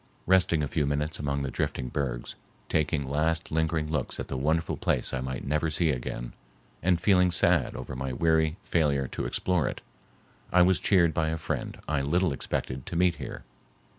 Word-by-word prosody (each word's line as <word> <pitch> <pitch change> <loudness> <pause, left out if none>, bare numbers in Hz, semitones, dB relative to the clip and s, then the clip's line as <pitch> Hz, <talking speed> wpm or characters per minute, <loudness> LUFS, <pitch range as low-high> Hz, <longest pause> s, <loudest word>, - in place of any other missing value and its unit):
Resting 90 -4 +3
a - - 0
few 75 +1 0
minutes 75 +2 -1
among 70 -1 -1
the 65 - -3
drifting 65 +1 -2
bergs, - - -3 0.3
taking 75 -1 +1
last 80 +4 0
lingering 80 0 +1
looks 75 -4 -2
at - - -5
the - - -3
wonderful 80 +5 0
place - - -1
I 65 - -1
might 65 0 -4
never 75 +3 0
see 80 0 +1
again, - - -4 0.5
and 90 0 +2
feeling 90 0 +4
sad 85 -4 +2
over 65 0 -6
my 65 +1 -3
weary 80 +3 +2
failure 70 -5 +1
to - - -4
explore 90 -7 +1
it, - - -4 0.7
I 90 0 +6
was 95 +1 +3
cheered 85 -5 +4
by 80 +1 +1
a 80 - -1
friend 75 - -4
I 75 -2 0
little 85 +4 +1
expected 65 -1 -4
to - - -5
meet 90 0 +3
here. - - -7
80 Hz, 185 wpm, -28 LUFS, 70-85 Hz, 0.7 s, I